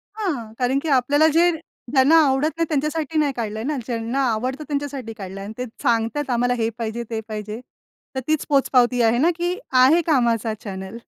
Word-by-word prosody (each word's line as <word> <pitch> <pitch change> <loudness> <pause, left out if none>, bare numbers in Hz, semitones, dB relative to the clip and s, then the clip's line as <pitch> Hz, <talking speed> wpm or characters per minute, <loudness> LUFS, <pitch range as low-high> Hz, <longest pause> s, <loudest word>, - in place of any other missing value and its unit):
हां. 280 - -3
कारण 255 +2 +1
की 320 - -2
आपल्याला 285 +4 +4
जे 345 +1 +5 0.4
ज्यांना 275 +3 +5
आवडत 270 +4 +2
नाही 330 - +1
त्यांच्यासाठी 305 +1 -1
नाही 285 -3 +1
काढलंय 220 -1 -4
ना, 290 +1 -2
ज्यांना 235 +2 -2
आवडतं 255 +7 -3
त्यांच्यासाठी 280 -5 -4
काढलंय 195 0 -7
आणि 210 +2 -7
ते 250 - -3 0.2
सांगतात 240 +4 0
आम्हाला 245 0 +1
हे 225 -2 0
पाहिजे 230 +1 -3
ते 225 -1 -2
पाहिजे. 215 +1 -5 0.6
तर - - 0
तीच 310 -1 0
पोचपावती 250 -3 +3
आहे 230 +1 +3
ना, 320 +7 +3
की 350 +2 -1 0.3
आहे 320 +6 +5
कामाचा 235 -6 +2
चॅनेल. 190 0 -7
255 Hz, 180 wpm, -22 LUFS, 225-295 Hz, 0.6 s, जे